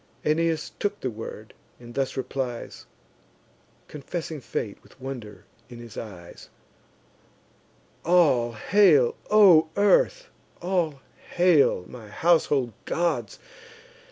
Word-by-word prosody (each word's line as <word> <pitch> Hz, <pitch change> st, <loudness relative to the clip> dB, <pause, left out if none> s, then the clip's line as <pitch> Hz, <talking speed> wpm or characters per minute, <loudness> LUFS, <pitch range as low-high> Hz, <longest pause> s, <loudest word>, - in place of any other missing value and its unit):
Aeneas 160 Hz, +1 st, 0 dB
took 205 Hz, 0 st, -2 dB
the 130 Hz, -, -3 dB
word, 110 Hz, 0 st, -9 dB, 0.3 s
and 120 Hz, -1 st, -12 dB
thus 135 Hz, 0 st, -2 dB
replies, 130 Hz, -2 st, -5 dB, 1.0 s
Confessing 155 Hz, +1 st, -6 dB
fate 105 Hz, -4 st, -5 dB
with -, -, -22 dB
wonder 110 Hz, -7 st, -8 dB, 0.2 s
in 120 Hz, -, -10 dB
his 120 Hz, -2 st, -11 dB
eyes: 90 Hz, -6 st, -10 dB, 1.5 s
"All 145 Hz, -9 st, +3 dB
hail, 150 Hz, -, +4 dB
O 185 Hz, -7 st, +6 dB
earth! -, -, +2 dB, 0.3 s
all 170 Hz, -6 st, -1 dB, 0.3 s
hail, 170 Hz, -, +3 dB
my 115 Hz, -4 st, -11 dB
household 145 Hz, -3 st, +1 dB
gods! 170 Hz, 0 st, -1 dB
140 Hz, 100 wpm, -25 LUFS, 120-175 Hz, 1.5 s, O